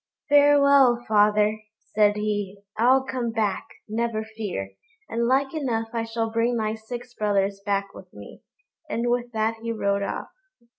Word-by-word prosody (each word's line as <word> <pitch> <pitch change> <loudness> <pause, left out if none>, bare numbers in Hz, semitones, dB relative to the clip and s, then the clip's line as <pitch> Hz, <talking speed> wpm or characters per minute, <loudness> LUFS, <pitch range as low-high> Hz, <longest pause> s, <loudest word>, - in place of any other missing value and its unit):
"Farewell, 280 -4 +5
father," 210 0 +3 0.3
said 210 -1 +4
he; 205 -2 -3
"I'll 255 +4 +4
come 255 -3 -3
back, 215 -3 -1 0.2
never 225 0 -2
fear, 215 - -5 0.4
and 235 +1 -1
like 270 +3 +1
enough 235 -7 -2
I 230 -1 -1
shall 225 0 -3
bring 230 +1 +1
my 215 -1 -1
six 240 +2 -8
brothers 200 -2 0
back 200 -1 -1
with - - -13
me;" - - -12 0.5
and 240 -2 -1
with 240 0 -1
that 220 +1 0
he 230 0 -3
rode 200 -3 0
off. 200 - -4
225 Hz, 150 wpm, -24 LUFS, 210-240 Hz, 0.5 s, Farewell